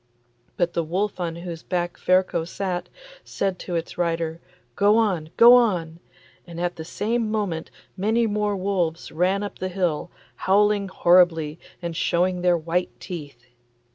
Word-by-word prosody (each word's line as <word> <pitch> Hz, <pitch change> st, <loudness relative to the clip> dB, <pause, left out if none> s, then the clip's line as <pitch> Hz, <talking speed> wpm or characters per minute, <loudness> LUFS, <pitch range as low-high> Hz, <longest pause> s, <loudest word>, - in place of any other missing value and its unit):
But 175 Hz, -1 st, 0 dB
the 170 Hz, -, 0 dB
wolf 190 Hz, +5 st, -2 dB
on 170 Hz, -2 st, -2 dB
whose 170 Hz, -1 st, -7 dB
back 175 Hz, -1 st, -2 dB
Ferko 185 Hz, -2 st, +2 dB
sat, 180 Hz, +1 st, -4 dB, 0.3 s
said 190 Hz, -2 st, -2 dB
to 175 Hz, -, -5 dB
its 165 Hz, +1 st, -4 dB
rider, 165 Hz, -1 st, -1 dB, 0.3 s
'Go 205 Hz, +2 st, +4 dB
on! 185 Hz, -9 st, +1 dB
go 235 Hz, +1 st, +9 dB
on!' 180 Hz, -10 st, +2 dB, 0.5 s
and 170 Hz, -1 st, -8 dB
at 175 Hz, 0 st, -1 dB
the 160 Hz, -, -7 dB
same 220 Hz, +6 st, -1 dB
moment 200 Hz, -7 st, -2 dB, 0.3 s
many 220 Hz, +5 st, +1 dB
more 210 Hz, -1 st, 0 dB
wolves 185 Hz, -4 st, -1 dB
ran 185 Hz, +5 st, +1 dB
up 205 Hz, -, -7 dB
the 185 Hz, -, -2 dB
hill, 175 Hz, -3 st, -1 dB, 0.3 s
howling 205 Hz, +1 st, +2 dB
horribly 170 Hz, -4 st, +3 dB, 0.2 s
and 170 Hz, -1 st, -3 dB
showing 180 Hz, +1 st, +1 dB
their 175 Hz, -1 st, +3 dB
white 170 Hz, +2 st, -2 dB
teeth. 145 Hz, -9 st, -8 dB
180 Hz, 150 wpm, -24 LUFS, 170-200 Hz, 0.5 s, go